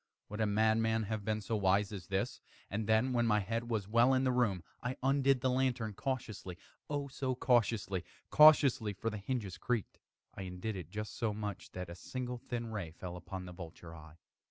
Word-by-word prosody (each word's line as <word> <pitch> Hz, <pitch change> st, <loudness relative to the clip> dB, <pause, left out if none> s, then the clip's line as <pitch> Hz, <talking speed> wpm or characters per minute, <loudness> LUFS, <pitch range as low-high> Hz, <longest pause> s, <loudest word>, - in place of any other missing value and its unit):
would 105 Hz, +2 st, -4 dB
a 110 Hz, -, +3 dB
madman 110 Hz, +1 st, +2 dB
have 110 Hz, 0 st, -3 dB
been 110 Hz, +1 st, 0 dB
so 110 Hz, +3 st, -2 dB
wise 100 Hz, 0 st, +2 dB
as 100 Hz, -3 st, -7 dB
this, 100 Hz, +5 st, -2 dB, 0.3 s
And 105 Hz, +1 st, -2 dB
then, 110 Hz, +4 st, +3 dB
when 120 Hz, -1 st, +2 dB
my 105 Hz, -1 st, +4 dB
head 115 Hz, +4 st, -2 dB
was 110 Hz, -4 st, -1 dB
well 120 Hz, +4 st, +5 dB
in 130 Hz, -, +2 dB
the 130 Hz, -, +3 dB
room, 110 Hz, -8 st, +1 dB, 0.2 s
I 125 Hz, +1 st, -3 dB
undid 135 Hz, -1 st, +3 dB
the 130 Hz, -, +2 dB
lantern 125 Hz, -4 st, 0 dB
cautiously 110 Hz, -7 st, -4 dB, 0.3 s
oh, 145 Hz, -1 st, -1 dB
so 130 Hz, -1 st, -2 dB
cautiously 115 Hz, -7 st, +2 dB, 0.3 s
cautiously 145 Hz, -8 st, +7 dB
(for 115 Hz, +4 st, -3 dB
the 105 Hz, -, -5 dB
hinges 100 Hz, -4 st, -3 dB
creaked) 120 Hz, -1 st, -2 dB, 0.3 s
I -, -, -7 dB
undid 95 Hz, +3 st, -4 dB
it 90 Hz, -4 st, -7 dB
just 105 Hz, +3 st, -5 dB
so 110 Hz, -3 st, -1 dB
much 105 Hz, -2 st, -5 dB
that 90 Hz, -1 st, -5 dB
a 85 Hz, -, -7 dB
single 125 Hz, +7 st, -5 dB
thin 120 Hz, -1 st, -4 dB
ray 100 Hz, -7 st, -3 dB
fell 85 Hz, +2 st, -7 dB
upon 90 Hz, +1 st, -7 dB
the 90 Hz, -, -8 dB
vulture 85 Hz, -1 st, -9 dB
eye. 80 Hz, 0 st, -13 dB
110 Hz, 200 wpm, -34 LUFS, 95-125 Hz, 0.3 s, cautiously